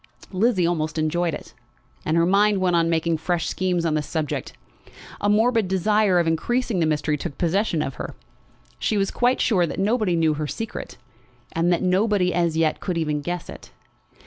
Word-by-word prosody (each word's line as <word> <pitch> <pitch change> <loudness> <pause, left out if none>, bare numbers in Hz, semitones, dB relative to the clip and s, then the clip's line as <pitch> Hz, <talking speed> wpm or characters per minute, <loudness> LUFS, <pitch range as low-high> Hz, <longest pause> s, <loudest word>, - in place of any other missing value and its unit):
Lizzie 195 -1 +2
almost 160 -2 -1
enjoyed 160 +1 0
it. - - -11 0.5
As 155 - +1
her 170 0 +4
mind 200 +3 +3
went 180 -2 +2
on 165 -1 +2
making 165 0 +1
fresh 170 +1 -1
schemes 180 -2 -1
on 160 - +1
the 155 - +1
subject, 150 0 -3 0.7
a 205 - 0
morbid 225 0 +3
desire 190 +1 +2
of 170 - +3
increasing 210 +6 0
the 160 - +2
mystery 150 0 0
took 140 - -6
possession 175 -2 +1
of 135 - -4
her. - - -6 0.6
She 215 - 0
was 195 -1 0
quite 245 +1 +1
sure 180 -6 +2
that - - -6
nobody 210 -2 +1
knew 160 -2 +2
her 150 0 -3
secret, 225 +8 -6 0.5
and 170 +2 +1
that 175 - +1
nobody 185 0 +2
as 170 -2 +1
yet 160 -1 +1
could 180 -3 -3
even 150 -2 -1
guess 175 +3 -4
it. - - -11
175 Hz, 185 wpm, -23 LUFS, 160-200 Hz, 0.7 s, her